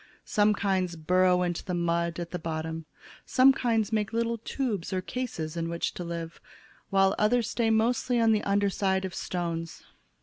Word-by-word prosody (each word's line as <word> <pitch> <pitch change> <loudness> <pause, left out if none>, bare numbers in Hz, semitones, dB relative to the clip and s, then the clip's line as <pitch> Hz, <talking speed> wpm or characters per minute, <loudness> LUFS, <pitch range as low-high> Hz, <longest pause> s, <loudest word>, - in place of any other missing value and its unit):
Some 210 0 +3
kinds 190 -3 0
burrow 180 +2 +3
into 175 -1 -2
the 180 - -3
mud 170 0 0
at 170 -1 -5
the 180 - -3
bottom, 160 0 -4 0.4
some 265 +1 +5
kinds 225 -5 0
make 210 -1 0
little 230 0 -1
tubes 220 -6 -3
or 185 - 0
cases 185 -8 -4
in 165 0 -2
which 170 0 -2
to 180 - -6
live, 170 -1 -6 0.5
while 195 -1 +4
others 225 +1 +2
stay 230 -2 +1
mostly 235 +2 +2
on 225 -1 +4
the 215 -1 +2
under 200 0 +1
side 190 -1 0
of 185 - -5
stones. 165 -3 -4
190 Hz, 175 wpm, -28 LUFS, 170-220 Hz, 0.5 s, some